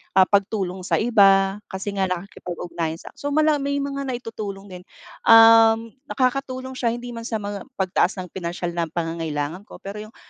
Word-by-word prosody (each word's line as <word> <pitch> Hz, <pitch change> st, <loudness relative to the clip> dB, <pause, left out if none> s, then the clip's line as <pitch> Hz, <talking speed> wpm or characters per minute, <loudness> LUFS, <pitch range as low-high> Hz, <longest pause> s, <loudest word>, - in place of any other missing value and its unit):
ah, 190 Hz, -, +8 dB
pagtulong 190 Hz, -2 st, -1 dB
sa -, -, +2 dB
iba, 195 Hz, -3 st, +4 dB
kasi 190 Hz, +1 st, -5 dB
nga 190 Hz, -, +2 dB
nakikipag 180 Hz, -1 st, -5 dB
ugnayan 170 Hz, -2 st, -3 dB
siya. -, -, -12 dB
So, 285 Hz, -, -4 dB
mala 305 Hz, 0 st, +2 dB
may 280 Hz, +1 st, -1 dB
mga 280 Hz, -1 st, -3 dB
naitutulong 215 Hz, -6 st, -6 dB
din, 180 Hz, 0 st, -9 dB, 0.4 s
um, 225 Hz, 0 st, +7 dB, 0.2 s
nakakatulong 260 Hz, 0 st, -2 dB
siya 235 Hz, -1 st, 0 dB
hindi 245 Hz, 0 st, -7 dB
man 230 Hz, 0 st, -6 dB
sa 225 Hz, -, -3 dB
mga 205 Hz, 0 st, -4 dB, 0.2 s
pagtaas 185 Hz, 0 st, +1 dB
ng 180 Hz, -, -13 dB
pinansiyal 175 Hz, -1 st, -4 dB
na 170 Hz, -1 st, -2 dB
pangangailangan 165 Hz, +1 st, -4 dB
ko. -, -, -13 dB
Pero 200 Hz, +2 st, -6 dB
yung 220 Hz, -, -20 dB
200 Hz, 175 wpm, -23 LUFS, 180-240 Hz, 0.4 s, ah